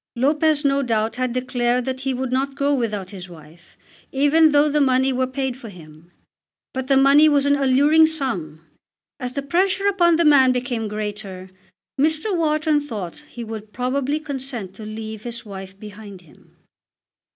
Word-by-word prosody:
Lopez 295 +3 +1
no 275 0 +2
doubt 225 -3 -1
had 255 -1 -1
declared 250 -1 -1
that 260 -1 -3
he 270 0 -1
would 260 0 -3
not 270 +1 -1
go 280 0 +1
without 210 -7 -2
his 185 -3 -9
wife, 160 0 -16 0.3
even 295 +3 +4
though 290 +1 +4
the 300 0 +1
money 260 0 +2
were 255 0 0
paid 260 -1 -3
for 245 -3 -10
him. 165 -2 -15 0.6
But 260 0 -4
the 270 -1 +4
money 280 +3 +6
was 285 -2 +2
an 285 0 +3
alluring 285 +4 +4
sum! 185 - -3 0.5
As 250 0 -5
the 280 - -3
pressure 380 +7 +1
upon 350 -4 +3
the 335 +1 +2
man 270 -4 +6
became 245 -3 -2
greater, 205 -3 -6 0.5
Mr. 315 +7 +1
Wharton 310 -2 +1
thought 215 - -6
he 240 - -8
would 220 -1 -8
probably 270 +4 -1
consent 265 -9 -5
to 215 - -8
leave 220 0 -7
his 235 0 -6
wife 195 -1 -9
behind 205 -2 -11
him. 165 -4 -23
255 Hz, 170 wpm, -21 LUFS, 215-285 Hz, 0.6 s, money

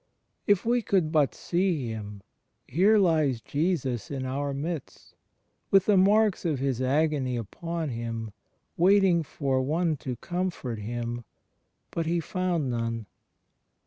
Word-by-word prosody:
If 205 -1 +3
we 240 +1 +2
could 185 -7 +1
but 150 -4 +2
see 175 -6 0
Him, 105 -2 -7 0.4
here 195 - +4
lies 155 - +3
Jesus 140 - -1
in 135 -2 -3
our 140 +2 -2
midst, 150 +2 -5 0.6
with 195 -1 +5
the 210 - +4
marks 205 +2 +4
of 160 -5 0
His 130 -2 -1
agony 135 -2 +1
upon 165 - -4
Him, 115 -2 -4 0.5
waiting 185 -1 +5
for 135 -3 -1
"one 160 +3 0
to 130 -2 -5
comfort" 175 - -3
Him, 120 +2 -4 0.7
but 165 -1 -2
He 170 +1 +1
"foimd 180 -1 -1
none." 115 -2 -2
150 Hz, 130 wpm, -27 LUFS, 125-180 Hz, 0.7 s, with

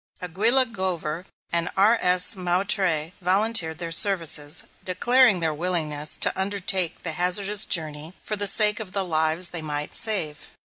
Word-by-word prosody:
Aguilla 220 +9 +1
Glover 185 -6 -4 0.3
and 170 0 0
R.S. 190 -3 +4
Moutrey 180 -3 -1
volunteered 185 -3 +1
their 165 0 -6
services, 165 -4 +1 0.2
declaring 210 +2 +2
their 160 -1 0
willingness 155 -3 -2
to - - 0
undertake 190 -2 -2
the 170 - -1
hazardous 195 +5 +1
journey 155 0 -3
for 210 - -3
the 205 0 -1
sake 210 +1 +5
of 205 -4 -9
the 195 -1 -1
lives 160 +1 -1
they 170 -2 -6
might 150 -1 -5
save. 190 -10 -3
180 Hz, 140 wpm, -23 LUFS, 160-200 Hz, 0.3 s, sake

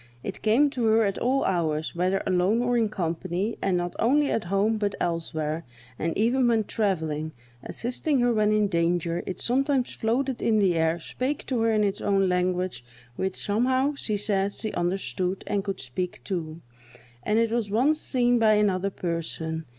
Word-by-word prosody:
It 195 - -6
came 255 +7 +3
to 250 -5 -1
her 225 +1 +4
at 200 -2 -1
all 260 +3 +1
hours, 160 -4 -1
whether 185 +3 0
alone 190 +6 +2
or 245 0 +1
in 225 -3 +2
company, 185 +2 -2
and 190 -2 +1
not 175 0 -3
only 285 +5 +3
at 215 - -1
home, 200 +4 +1
but 205 -1 -1
elsewhere, 160 -2 -2 0.4
and 165 +1 -1
even 240 +4 +3
when 225 -2 +3
travelling, 160 -8 -2 0.3
assisting 255 +4 -1
her 240 0 +3
when 215 -1 +2
in 210 -1 +3
danger; 170 -1 0
it 185 - -4
sometimes 270 +1 +1
floated 250 +3 -1
in 220 -1 +2
the 195 -4 +3
air, 160 0 +1
spake 260 - -3
to 255 -3 -1
her 225 0 +2
in 215 -1 +2
its 200 -1 -1
own 195 -1 +2
language, 180 -5 -1 0.3
which 190 +5 -2
somehow, 255 +7 +1
she 215 -7 -1
says, 200 -1 0
she 220 - -3
understood, 185 +1 -2
and 200 -1 -1
could 195 -1 -4
speak, 140 +8 -4
too; 165 -4 -4 0.6
and 210 - 0
it 230 -1 +2
was 230 -3 -1
once 270 +9 +2
seen 245 -2 +2
by 220 -1 +5
another 200 -2 +2
person. 165 -3 -4
200 Hz, 180 wpm, -26 LUFS, 175-230 Hz, 0.6 s, by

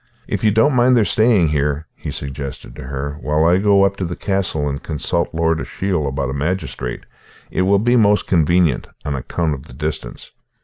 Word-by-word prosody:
"If - - -3
you 110 - +5
don't 110 +8 +3
mind 125 0 +4
their 110 - +4
staying 105 -4 +3
here," 75 +1 0
he - - -7
suggested 70 -3 -7
to - - -9
her, 70 +2 -5
"while 75 +4 +1
I 85 +2 +5
go 100 0 +4
up 100 0 +1
to - - -3
the 85 0 -3
castle 95 -7 -1
and 70 0 -3
consult 85 +2 -1
Lord 80 0 0
Ashiel 90 -7 -2
about 70 -1 -2
a - - -3
magistrate, 70 -5 -3 0.5
it - - 0
will 100 +2 +4
be 120 +5 +2
most 105 -3 +4
convenient, 85 -4 +2 0.2
on 75 - -1
account 75 +4 -2
of 65 -2 -8
the - - -13
distance." 75 +4 -5
80 Hz, 195 wpm, -19 LUFS, 70-100 Hz, 0.5 s, you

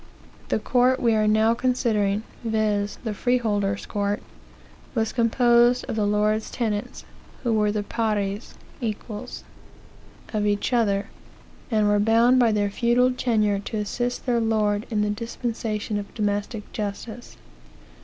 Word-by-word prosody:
The - - +2
court 255 +1 +2
we 235 -2 +3
are 215 -1 +2
now 220 +2 +4
considering, 220 -5 +1 0.2
viz., 215 -2 0
the 220 -3 -2
freeholders 205 -4 0
court, 205 0 -2 0.7
was 220 -2 0
composed 240 +1 +4
of - - -3
the 210 -2 +1
lord's 210 +1 +1
tenants, 215 -4 -3 0.4
who 235 -2 +1
were 210 -1 +2
the 210 0 -2
pares 210 -1 -2 0.3
(equals) 215 -2 -5 0.9
of 210 -1 +1
each 205 +4 0
other, 205 -4 +1 0.6
and 215 -3 +2
were 205 0 +3
bound 230 +4 +4
by 235 -2 +4
their 205 -1 0
feudal 240 +3 +3
tenure 215 -5 +1
to 210 +2 -5
assist 245 +4 -2
their 245 -2 +2
lord 215 -1 +1
in 210 -3 +1
the 210 - 0
dispensation 220 -1 -3
of 200 - -8
domestic 205 0 -2
justice. 215 +3 -6
215 Hz, 135 wpm, -24 LUFS, 205-235 Hz, 0.9 s, now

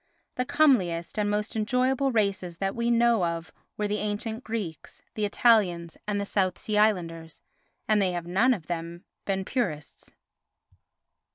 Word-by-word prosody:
The 250 - -2
comeliest 195 - +2
and 205 -1 +1
most 210 +1 -2
enjoyable 255 +5 +1
races 200 -6 0
that 195 +2 -2
we 235 0 0
know 235 -3 +3
of 170 0 -3 0.2
were 210 - 0
the 210 +1 -1
ancient 220 +3 -3
Greeks, 210 -8 -6
the 215 - -1
Italians 195 -7 +2
and 205 -1 0
the 200 - -2
South 185 -3 0
Sea 210 -1 -1
Islanders, 165 -6 0 0.5
and 215 -1 +3
they 185 -2 +1
have 175 -1 -4
none 225 +9 +3
of 170 -7 -10
them 170 +1 -5 0.2
been 190 -1 -1
purists. 155 - -3
205 Hz, 155 wpm, -27 LUFS, 175-225 Hz, 0.5 s, know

